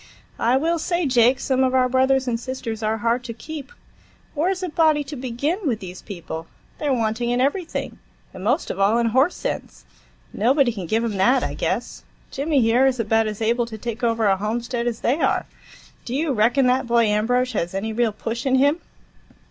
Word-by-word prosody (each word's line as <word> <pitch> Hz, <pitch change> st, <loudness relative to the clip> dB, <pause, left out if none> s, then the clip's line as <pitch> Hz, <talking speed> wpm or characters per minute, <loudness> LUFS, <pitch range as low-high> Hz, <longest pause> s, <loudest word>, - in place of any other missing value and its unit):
"I 240 Hz, +3 st, +3 dB
will 330 Hz, +4 st, 0 dB
say, 345 Hz, +1 st, -1 dB
Jake, 250 Hz, 0 st, +4 dB
some 265 Hz, -1 st, +1 dB
of 260 Hz, 0 st, +1 dB
our 255 Hz, -1 st, +4 dB
brothers 260 Hz, +1 st, +2 dB
and 230 Hz, -2 st, 0 dB
sisters 235 Hz, -3 st, -5 dB
are 220 Hz, 0 st, 0 dB
hard 235 Hz, +3 st, 0 dB
to 230 Hz, -, -6 dB
keep. 305 Hz, -, -8 dB, 0.6 s
Where's 365 Hz, +5 st, -1 dB
a 365 Hz, -, -2 dB
body 310 Hz, -2 st, +3 dB
to 290 Hz, +1 st, -8 dB
begin, 265 Hz, -, -2 dB
with 230 Hz, -5 st, 0 dB
these 185 Hz, -3 st, -9 dB
people? 170 Hz, -4 st, -7 dB, 0.3 s
They're 295 Hz, -2 st, 0 dB
wanting 230 Hz, -1 st, 0 dB
in 245 Hz, +1 st, +1 dB
everything, 320 Hz, +6 st, -2 dB, 0.3 s
and 185 Hz, -, -9 dB
most 250 Hz, -, 0 dB
of 190 Hz, -, -6 dB
all 200 Hz, +4 st, +3 dB
in 235 Hz, -, +2 dB
horse 265 Hz, +9 st, +3 dB
sense. -, -, -5 dB, 0.5 s
Nobody 255 Hz, +3 st, +3 dB
can 190 Hz, -5 st, -6 dB
give 225 Hz, +6 st, +1 dB
'em 220 Hz, -4 st, -2 dB
that, 245 Hz, +7 st, +3 dB
I -, -, -2 dB
guess. -, -, -3 dB, 0.3 s
Jimmy, 285 Hz, 0 st, +1 dB
here, 240 Hz, +4 st, +4 dB
is 255 Hz, -2 st, 0 dB
about 225 Hz, 0 st, +2 dB
as 215 Hz, +1 st, -4 dB
able 235 Hz, +1 st, +1 dB
to 220 Hz, -1 st, -7 dB
take 235 Hz, +2 st, -6 dB
over 230 Hz, -1 st, +1 dB
a 195 Hz, -1 st, +3 dB
homestead 235 Hz, +4 st, -2 dB
as 235 Hz, -2 st, -3 dB
they 265 Hz, +7 st, +1 dB
are. -, -, +1 dB, 0.6 s
Do 245 Hz, -, -4 dB
you 295 Hz, 0 st, 0 dB
reckon 245 Hz, +4 st, +3 dB
that 250 Hz, 0 st, +2 dB
boy 235 Hz, -1 st, +3 dB
Ambrosch 245 Hz, +4 st, +1 dB
has 175 Hz, -3 st, -2 dB
any 220 Hz, +3 st, -2 dB
real 230 Hz, 0 st, +1 dB
push 230 Hz, +5 st, -4 dB
in 260 Hz, -, +3 dB
him?" 285 Hz, +5 st, +3 dB
245 Hz, 205 wpm, -22 LUFS, 225-270 Hz, 0.6 s, Jake